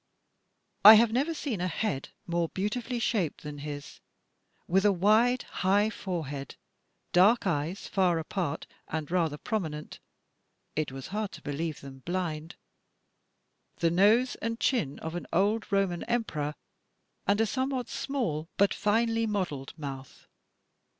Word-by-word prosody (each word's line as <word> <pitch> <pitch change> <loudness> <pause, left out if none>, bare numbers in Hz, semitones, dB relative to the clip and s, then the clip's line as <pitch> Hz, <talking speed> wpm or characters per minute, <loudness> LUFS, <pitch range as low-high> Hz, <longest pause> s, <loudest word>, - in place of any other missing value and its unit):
I 215 +2 +13
have 225 +1 +5
never 275 +8 +1
seen 255 - -3
a 180 - +1
head 165 -6 -2 0.2
more 170 -1 0
beautifully 230 +6 -2
shaped 215 -8 -1
than 150 -1 -7
his, 145 0 -7 0.7
with 190 +3 +3
a 205 - +5
wide, 215 +7 +3
high 205 +3 +1
forehead, 150 -9 -5 0.6
dark 205 +7 +5
eyes 170 +2 -1
far 185 -4 +2
apart 165 -1 -3 0.2
and 155 0 -4
rather 165 -5 +1
prominent 155 -6 -4 0.4
— - - -47 0.3
it 155 -3 -1
was 135 0 -7
hard 210 0 -2
to - - -10
believe 155 +2 -3
them 135 -1 -10
blind 165 +1 -3 0.6
— - - -48
the 165 -1 +3
nose 215 +8 +4
and 230 +1 -2
chin 210 - +1
of 160 - -5
an 175 - -5
old 205 +6 +1
Roman 195 -3 +1
Emperor, 155 -11 -1 0.7
and 205 +1 +3
a 225 - +4
somewhat 260 +1 -1
small 175 - -2
but 200 0 +4
finely 225 +2 +1
modelled 180 -10 -3
mouth. 135 -3 -8
185 Hz, 140 wpm, -29 LUFS, 155-220 Hz, 0.7 s, I